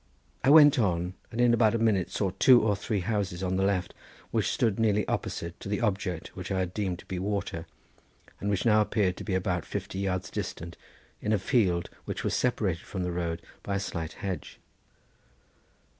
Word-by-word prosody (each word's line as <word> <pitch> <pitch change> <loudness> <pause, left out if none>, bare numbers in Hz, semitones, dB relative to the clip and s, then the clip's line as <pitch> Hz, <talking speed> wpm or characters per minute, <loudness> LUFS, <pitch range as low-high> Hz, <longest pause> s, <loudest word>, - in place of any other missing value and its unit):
I 130 - +4
went 145 -2 +8
on, 90 -4 0 0.2
and 115 - -5
in 120 -1 +5
about 115 -2 +4
a - - +3
minute 110 -5 +2
saw 95 -3 -1
two 125 -2 +8
or 105 -2 +2
three 100 0 -2
houses 95 -2 -2
on 95 0 0
the 95 - +1
left, 95 -3 0 0.4
which - - +1
stood 110 -2 +1
nearly 105 -2 +2
opposite 85 0 -3
to - - -7
the 105 - 0
object 95 -6 -2
which 95 +2 -6
I 95 - 0
had 90 -1 -1
deemed 95 -4 -2
to - - -14
be 90 - -4
water, 95 -4 -3 0.7
and 100 - -2
which 100 +1 0
now 110 -2 +5
appeared 100 -3 +1
to - - -6
be 95 - -1
about 90 -2 0
fifty 95 - -5
yards 95 -2 -2
distant 85 +1 -5 0.5
in 105 - -1
a - - +4
field 95 -6 +1
which - - -4
was - - 0
separated 100 -9 0
from 95 -2 -5
the 90 - -2
road 85 -1 -3 0.2
by 100 - -3
a - - +1
slight 80 -5 -4
hedge. 95 -6 -5
95 Hz, 200 wpm, -28 LUFS, 90-105 Hz, 0.7 s, went